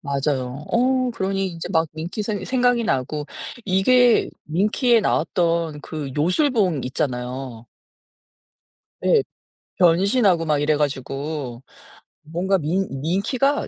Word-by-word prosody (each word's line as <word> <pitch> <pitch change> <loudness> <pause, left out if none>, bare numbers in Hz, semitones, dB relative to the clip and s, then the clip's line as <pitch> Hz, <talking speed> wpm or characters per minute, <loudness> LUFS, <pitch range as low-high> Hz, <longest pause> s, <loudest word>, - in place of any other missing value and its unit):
맞아요 140 -1 -2
어 255 +1 +2
그러니 195 0 -1
이제 170 -1 -6
막 160 -2 +2
밍키 165 +7 -4
생 205 -2 -3
생각이 245 -2 +2
나고 145 +1 -1 0.4
이게 235 +5 +4
밍키에 215 - +2
나왔던 165 -4 0
그 150 -4 -6
요술봉 185 - +2
있잖아요. 125 -2 -4 1.4
예. 445 -4 +4 0.6
변신하고 185 0 +3
막 150 -2 +1
이래 150 +1 +2
가지고 140 -2 -3 0.6
뭔가 180 +5 0
밍 180 +6 -1
밍키가 235 - 0
170 Hz, 225 characters per minute, -22 LUFS, 145-210 Hz, 1.4 s, 이게